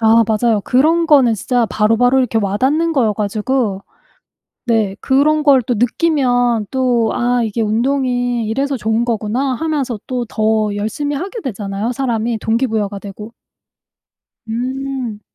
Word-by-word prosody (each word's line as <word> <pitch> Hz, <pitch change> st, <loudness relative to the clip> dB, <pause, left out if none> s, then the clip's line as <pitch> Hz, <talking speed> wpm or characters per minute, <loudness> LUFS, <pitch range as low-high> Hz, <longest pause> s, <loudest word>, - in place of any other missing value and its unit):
아 225 Hz, 0 st, +5 dB
맞아요. 220 Hz, -1 st, +1 dB
그런 320 Hz, +6 st, +2 dB
거는 270 Hz, -7 st, +5 dB
진짜 240 Hz, +3 st, 0 dB
바로바로 225 Hz, +5 st, +2 dB
이렇게 250 Hz, -3 st, +1 dB
와닿는 265 Hz, +12 st, 0 dB
거여 235 Hz, -8 st, +2 dB
가지고. 210 Hz, 0 st, -1 dB, 0.9 s
네. 215 Hz, -4 st, +1 dB
그런 300 Hz, +3 st, +2 dB
걸 275 Hz, -4 st, +5 dB
또 245 Hz, +2 st, -1 dB
느끼면 245 Hz, -3 st, +1 dB
또 245 Hz, -4 st, +1 dB
'아 245 Hz, 0 st, +1 dB
이게 225 Hz, +1 st, -2 dB
운동이 245 Hz, +1 st, 0 dB
이래서 275 Hz, +4 st, -1 dB
좋은 220 Hz, 0 st, 0 dB
거구나.'하면서 250 Hz, +3 st, -2 dB
또 250 Hz, -2 st, -2 dB
더 215 Hz, -1 st, 0 dB
열심히 220 Hz, +8 st, -3 dB
하게 390 Hz, -, -5 dB
되잖아요, 205 Hz, -1 st, -3 dB
사람이 235 Hz, -3 st, -1 dB
동기부여가 220 Hz, -3 st, -1 dB
되고. 210 Hz, +3 st, -9 dB, 1.2 s
음. 255 Hz, -1 st, -4 dB
240 Hz, 285 characters per minute, -17 LUFS, 220-265 Hz, 1.2 s, 아